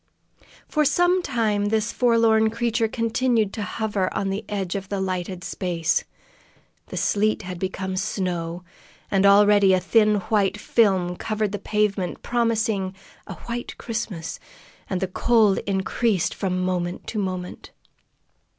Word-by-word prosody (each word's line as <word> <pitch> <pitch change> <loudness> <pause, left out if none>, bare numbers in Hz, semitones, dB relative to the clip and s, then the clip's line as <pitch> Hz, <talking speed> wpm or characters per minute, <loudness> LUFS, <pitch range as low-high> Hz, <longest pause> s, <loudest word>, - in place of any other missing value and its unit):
For 305 - +1
some 355 +5 +3
time 220 -8 0
this 220 +2 0
forlorn 230 -2 +3
creature 230 0 0
continued 230 -2 0
to 220 - -4
hover 205 -1 -2
on 195 -1 -1
the 200 +3 -3
edge 195 -4 -2
of 195 -1 -5
the 200 - -2
lighted 185 -1 -3
space. 175 -1 -1 0.8
The - - -7
sleet 215 +1 +1
had 180 -1 -6
become 190 0 -3
snow, 180 -3 -2 0.5
and 195 0 +4
already 205 -1 +6
a - - +1
thin 210 +3 +3
white 200 +1 +1
film 190 -6 +2
covered 215 -2 -2
the 205 - -4
pavement, 205 -3 -1
promising 225 -5 0 0.3
"a - - -6
white 240 0 -5
Christmas," 210 -8 -5 0.5
and 190 -1 -2
the 190 - 0
cold 215 +1 +3
increased 195 0 0
from 185 -2 -2
moment 180 -1 -2
to 215 - -3
moment. 185 -2 -4
205 Hz, 135 wpm, -23 LUFS, 185-225 Hz, 0.8 s, already